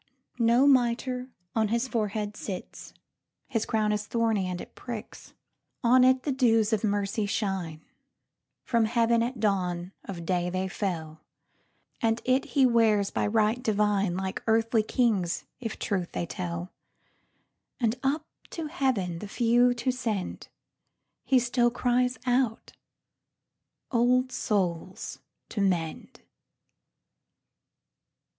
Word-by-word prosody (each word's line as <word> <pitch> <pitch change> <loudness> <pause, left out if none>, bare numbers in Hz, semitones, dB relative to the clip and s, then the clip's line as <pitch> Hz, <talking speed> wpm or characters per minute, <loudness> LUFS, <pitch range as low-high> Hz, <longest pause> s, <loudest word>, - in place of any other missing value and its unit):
No 235 +3 +4
mitre 250 -1 +2 0.3
on 220 -1 +2
his 235 +4 0
forehead 210 -3 -2
sticks:His 215 +4 -7
crown 215 -1 +1
is 210 0 -2
thorny, 225 -5 +1
and 180 -1 -3
it - - -10
pricks. 235 -4 -8 0.5
On 250 +2 +6
it 260 0 +4
the 290 - -1
dews 225 -4 +3
of 220 - +1
mercy 205 0 0
shine; 190 -7 -2 0.8
From 230 -2 +2
heaven 230 +1 +2
at 240 +1 -2
dawn 180 -4 0
of 170 -4 -6
day 180 0 0
they 185 +1 -1
fell; 165 -6 -4 0.8
And 225 0 +2
it 255 +1 +2
he 275 -3 +3
wears 220 -4 +3
by - - 0
right 220 +2 +2
divine, 205 -5 +1
Like 190 0 -3
earthly 225 0 +3
kings, 215 -6 0 0.2
if 225 -3 -5
truth 185 -4 -2
they - - -2
tell; 175 +1 -5 1.1
And 230 -2 +1
up 280 +3 0 0.2
to 325 - -5
heaven 255 - -1
the 210 - -6
few 240 +3 +3
to 240 +2 0
send, 225 -7 -3 0.8
He 265 - +4
still 240 0 +2
cries 250 +1 +1
out, 245 -2 0 1.2
"Old 250 +1 +3
souls 185 -5 -2 0.3
to 205 - -2
mend!" 175 -5 -1
220 Hz, 120 wpm, -28 LUFS, 195-245 Hz, 1.2 s, On